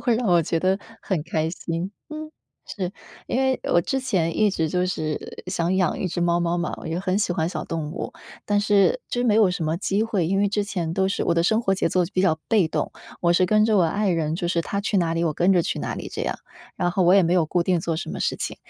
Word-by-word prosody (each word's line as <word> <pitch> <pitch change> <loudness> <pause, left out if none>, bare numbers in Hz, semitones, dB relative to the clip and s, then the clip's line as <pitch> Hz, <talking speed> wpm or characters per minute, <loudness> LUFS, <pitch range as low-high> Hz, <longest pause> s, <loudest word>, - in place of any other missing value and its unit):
会 240 -3 +2
让 240 0 -1
我 175 -3 +4
觉 165 - -1
得 185 +3 +1 0.2
很 180 -6 -1
开 160 -1 -1
心。 170 +2 -4 0.2
嗯， 310 0 -7 0.4
是， 185 -2 -4 0.3
因 - - -1
为 265 -1 +1
我 175 - +6
之 270 +8 -1
前 185 -11 0
一 210 -1 +4
直 160 -4 -1
就 180 +2 +1
是 155 -4 -4
想 175 +1 0
养 185 -4 +1
一 185 - -1
只 175 - -3
猫 170 0 +2
猫 175 0 0
嘛， 175 0 -2
我 - - -7
就 165 +2 -2
很 190 +1 0
喜 205 - 0
欢 160 -2 0
小 - - -4
动 160 -2 -4
物， 170 - -5 0.3
但 205 0 +2
是 205 - +3
就 245 - -1
没 220 - +3
有 215 -4 +5
什 180 -2 -3
么 155 +1 0
机 195 +3 0
会， 205 -7 0
因 195 +3 +1
为 205 0 +3
之 205 0 0
前 175 -5 -3
都 190 +1 +2
是， 195 - -1
我 170 - +2
的 170 - +2
生 220 +6 +2
活 195 -4 +1
节 - - 0
奏 180 -1 +2
比 185 - +1
较 160 -5 +2
被 210 -7 +4
动， - - -2 0.3
我 170 -1 +3
是 180 +1 +4
跟 215 +2 +4
着 220 -1 +3
我 190 - +5
爱 200 +5 +1
人， 160 -2 0
就 175 - -2
是 170 -1 +1
他 200 +4 -2
去 205 0 -1
哪 165 -2 +1
里 165 +1 0
我 160 - +1
跟 180 +5 +3
着 180 - +4
去 - - -2
哪 - - -3
里 - - -6
这 - - -3
样， - - -2 0.4
然 175 -2 0
后 185 +1 +1
我 175 +1 +5
也 195 - +6
没 170 0 +1
有 175 -3 +4
固 175 +2 +1
定 175 -2 +1
做 165 -1 -2
什 160 - -5
么 - - -5
事 - - 0
情。 - - -4
180 Hz, 300 characters per minute, -24 LUFS, 170-200 Hz, 0.4 s, 我